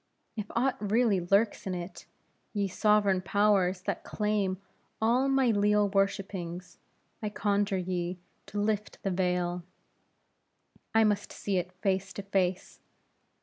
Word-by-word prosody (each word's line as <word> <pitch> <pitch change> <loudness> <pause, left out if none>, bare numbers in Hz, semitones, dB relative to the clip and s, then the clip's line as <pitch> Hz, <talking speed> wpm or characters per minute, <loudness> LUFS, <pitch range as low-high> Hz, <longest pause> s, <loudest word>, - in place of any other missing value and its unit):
If 210 -2 -4
aught 255 +3 +2
really 220 -5 +3
lurks 200 +4 +1
in 185 - -1
it, 175 +1 -7 0.5
ye 200 -2 0
sovereign 200 -1 +3
powers 190 -1 +2
that - - -3
claim 210 -3 0 0.4
all 245 +5 +3
my 270 -3 +3
leal 205 0 +3
worshipings, 190 -3 -2 0.4
I 210 - -2
conjure 205 -1 0
ye 180 -1 -2 0.3
to 205 - -4
lift 210 0 -1
the 195 - 0
veil; 180 -1 0 1.3
I 225 - +6
must 205 -1 +1
see 200 -2 -2
it 180 0 -2
face 195 0 0
to 200 - -6
face. 190 -2 -1
200 Hz, 130 wpm, -29 LUFS, 185-210 Hz, 1.3 s, I